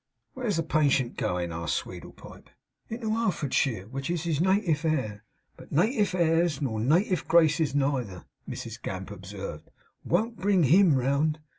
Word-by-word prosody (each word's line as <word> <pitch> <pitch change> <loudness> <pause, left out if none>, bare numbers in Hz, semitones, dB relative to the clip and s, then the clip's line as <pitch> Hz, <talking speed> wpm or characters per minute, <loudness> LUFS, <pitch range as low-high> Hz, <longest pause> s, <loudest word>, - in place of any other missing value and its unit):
'Where's 240 -6 -2
the 165 - 0
patient 140 -6 +1
goin?' 90 -1 -2
asked 85 0 -2
Sweedlepipe. - - -8 0.4
'Into 225 -1 -3
Har'fordshire, 145 - 0
which 135 +3 -5
is 175 -2 -1
his 165 -3 0
native 185 -4 +2
air. 130 -10 -1 0.3
But - - -14
native 205 - +1
airs 165 -3 +2
nor 115 -7 -2
native 170 - +1
graces 160 -3 +3
neither,' 130 -10 -1 0.2
Mrs 115 +1 -7
Gamp 95 +1 -5
observed, 95 -5 -8 0.3
'won't 230 +2 0
bring 195 -3 +3
HIM 165 +2 +5
round. 140 +4 +1
150 Hz, 140 wpm, -27 LUFS, 120-175 Hz, 0.4 s, HIM